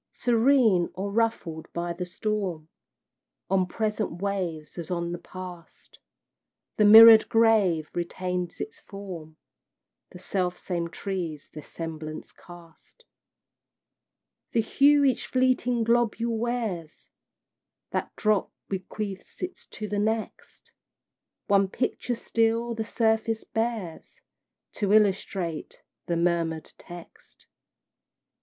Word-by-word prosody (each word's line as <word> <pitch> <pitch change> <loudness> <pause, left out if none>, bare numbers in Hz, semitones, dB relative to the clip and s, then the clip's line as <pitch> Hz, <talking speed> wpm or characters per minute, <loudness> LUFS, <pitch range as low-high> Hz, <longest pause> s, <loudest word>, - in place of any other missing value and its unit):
Serene, 235 -6 +3
or 195 +2 -3
ruffled 200 -8 -1
by 170 0 -2
the 180 +1 -5
storm, 185 -5 -3 0.8
On 190 -1 +2
present 210 -3 -2
waves 175 -6 -3
as 165 - -6
on 170 -1 -2
the 175 - -5
past, 180 -2 -11 0.8
The 210 - +4
mirrored 220 +1 +10
grave 210 -9 +3
retains 180 0 -3
its 220 - -6
form, 175 -6 -9 0.7
The - - -12
self 180 -1 -2
same 170 -2 -3
trees 170 -4 -5
their 150 - -7
semblance 155 -1 -7
cast. 175 - -17 1.5
The 230 - +3
hue 285 +5 +4
each 265 -2 +1
fleeting 255 -2 +1
globule 235 0 +1
wears, 220 -9 -3 0.8
That - - -2
drop 215 -2 +1 0.2
bequeaths 195 - -6
it 365 +1 -6
to 215 - -6
the 205 0 -2
next, 220 +1 -3 0.7
One 200 -1 +3
picture 245 +3 -2
still 230 +1 0
the 225 -1 -3
surface 220 0 0
bears, 225 -7 -4 0.6
To 205 -1 +1
illustrate 195 -5 0 0.2
the 170 - 0
murmured 170 -2 -1
text. 175 -1 -13
195 Hz, 105 wpm, -26 LUFS, 175-225 Hz, 1.5 s, mirrored